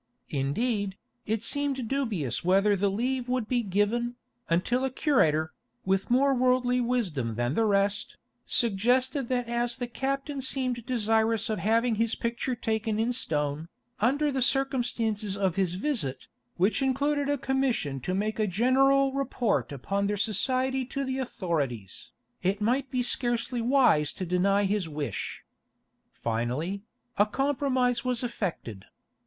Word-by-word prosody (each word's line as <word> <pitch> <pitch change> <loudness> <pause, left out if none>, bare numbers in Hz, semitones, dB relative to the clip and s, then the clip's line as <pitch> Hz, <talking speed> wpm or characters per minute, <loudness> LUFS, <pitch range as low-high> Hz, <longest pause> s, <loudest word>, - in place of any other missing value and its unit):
Indeed, 200 - -1 0.3
it 220 0 -1
seemed 275 -2 0
dubious 215 - -1
whether 195 +3 +4
the 200 +1 +1
leave 245 +5 -1
would 250 -3 0
be 245 0 +1
given, 225 +4 0 0.3
until 210 +10 +1
a 265 - +1
curator, 160 - +2 0.3
with 190 0 0
more 270 +3 +4
worldly 250 0 +2
wisdom 180 - -1
than 120 +3 -1
the 225 - +2
rest, 200 0 +1 0.3
suggested 245 +4 +2
that 245 -2 0
as 240 0 0
the 245 - -3
captain 275 +3 -3
seemed 255 -3 -1
desirous 225 -2 +1
of 215 - -1
having 225 +2 +2
his 230 -1 +1
picture 235 +2 -2
taken 220 -1 -1
in 235 +2 +1
stone, 150 - -1 0.3
under 285 +7 +2
the 265 -1 -1
circumstances 235 -6 0
of 190 -4 0
his 185 -3 0
visit, 190 - -1 0.3
which 195 +9 +2
included 280 +2 +1
a 285 - +1
commission 260 - -1
to 180 +9 -2
make 215 +2 -1
a 215 - +2
general 265 +7 +3
report 255 - 0
upon 195 +9 -2
their 205 0 -1
society 255 +5 +1
to 275 +2 -4
the 265 0 -2
authorities, 155 - -3 0.3
it 195 +3 0
might 255 +5 0
be 255 -2 0
scarcely 240 0 0
wise 235 - +3
to 185 - -4
deny 195 +3 +2
his 200 -3 0
wish. 150 -2 -4 0.6
Finally, 125 - -2 0.4
a 205 - +7
compromise 255 -1 0
was 250 -1 0
effected. 175 - -4
230 Hz, 140 wpm, -28 LUFS, 195-255 Hz, 0.6 s, a